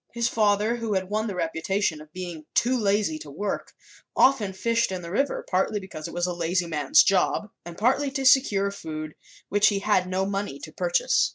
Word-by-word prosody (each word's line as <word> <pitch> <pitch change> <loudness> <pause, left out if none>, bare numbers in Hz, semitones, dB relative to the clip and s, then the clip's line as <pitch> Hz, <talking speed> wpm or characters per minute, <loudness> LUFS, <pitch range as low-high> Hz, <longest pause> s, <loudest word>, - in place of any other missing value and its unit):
His 235 0 +1
father, 215 +1 +2
who 225 -3 -2
had 190 +1 -2
won 215 +1 0
the 200 - -4
reputation 165 0 -1
of 155 0 -15
being 175 -3 -7
too 250 +2 +3
lazy 200 -8 +1
to 150 - -10
work, 195 +8 -4 0.4
often 255 -7 +4
fished 230 +3 0
in 185 -1 -4
the 170 - -7
river, 275 +8 -1
partly 190 +3 0
because 175 -5 -8
it - - -9
was 175 0 0
"a 180 - -2
lazy 175 +1 0
man's 150 -5 +4
job" 195 +2 +1
and 175 0 -9
partly 265 +5 +2
to 270 0 -3
secure 210 -7 +4
food 155 -5 -7 0.4
which 205 +1 +4
he 205 - +2
had 195 -2 +1
no 185 +1 -1
money 200 +1 -3
to - - -10
purchase. - - +1
195 Hz, 200 wpm, -25 LUFS, 175-220 Hz, 0.4 s, often